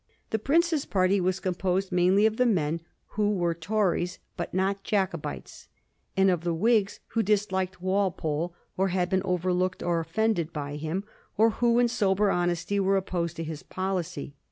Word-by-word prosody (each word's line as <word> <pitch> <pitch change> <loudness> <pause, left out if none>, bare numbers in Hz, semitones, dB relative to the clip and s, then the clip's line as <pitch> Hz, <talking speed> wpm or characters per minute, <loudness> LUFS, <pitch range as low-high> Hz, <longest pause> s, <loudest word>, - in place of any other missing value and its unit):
The 220 - +1
Prince's 315 +4 +2
party 190 0 +2
was 185 +1 0
composed 185 +1 -1
mainly 185 +3 +4
of 220 0 +2
the 250 - +3
men 165 -6 +1 0.3
who 210 0 0
were 175 -2 +1
Tories 180 0 0 0.2
but - - -4
were - - -2
not 195 +1 0
Jacobites, 195 -2 -3 0.5
and 195 0 +5
of 175 -2 -1
the 170 -1 0
Whigs 210 +2 +2
who 225 - +1
disliked 190 -3 0
Walpole 175 -4 0 0.2
or 190 +1 +2
had 180 -1 0
been 190 0 +2
overlooked 180 0 0
or 170 -1 +1
offended 170 0 0
by 145 -2 -4
him, 160 +6 -3 0.3
or 225 +2 +5
who 235 +1 +2
in 245 0 +5
sober 205 -3 +2
honesty 175 +3 0
were 195 0 +3
opposed 170 -3 -2
to 165 - -4
his 155 -1 -6
policy. 185 -7 -3
185 Hz, 170 wpm, -27 LUFS, 175-205 Hz, 0.5 s, and